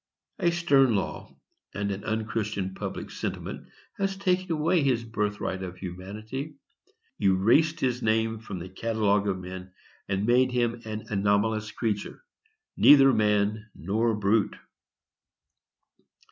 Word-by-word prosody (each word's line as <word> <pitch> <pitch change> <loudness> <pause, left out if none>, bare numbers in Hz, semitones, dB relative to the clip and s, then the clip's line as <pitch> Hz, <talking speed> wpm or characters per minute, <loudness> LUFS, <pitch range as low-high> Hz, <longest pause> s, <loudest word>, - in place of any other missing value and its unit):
A 175 - +3
stern 140 -8 +3
law 100 - -3 0.4
and 100 0 -1
an 100 +1 -5
unchristian 105 -3 -2
public - - -6
sentiment - - -5 0.3
has 195 0 -1
taken 185 -2 0
away 160 +2 +2
his 130 -5 +1
birthright 105 -4 -2
of 90 -1 -6
humanity, 105 - -7 0.7
erased 115 - +3
his 125 -1 0
name 110 0 +1
from 110 -4 -7
the 90 +1 -7
catalogue 105 0 0
of 95 -2 0
men, 95 0 -8 0.4
and 95 +1 0
made 125 +2 +4
him 120 -1 0
an 110 0 -5
anomalous 105 +2 +1
creature—neither 145 - +2
man 105 +1 +1
nor 110 +6 0
brute. 105 +1 +1
110 Hz, 120 wpm, -27 LUFS, 100-130 Hz, 0.7 s, made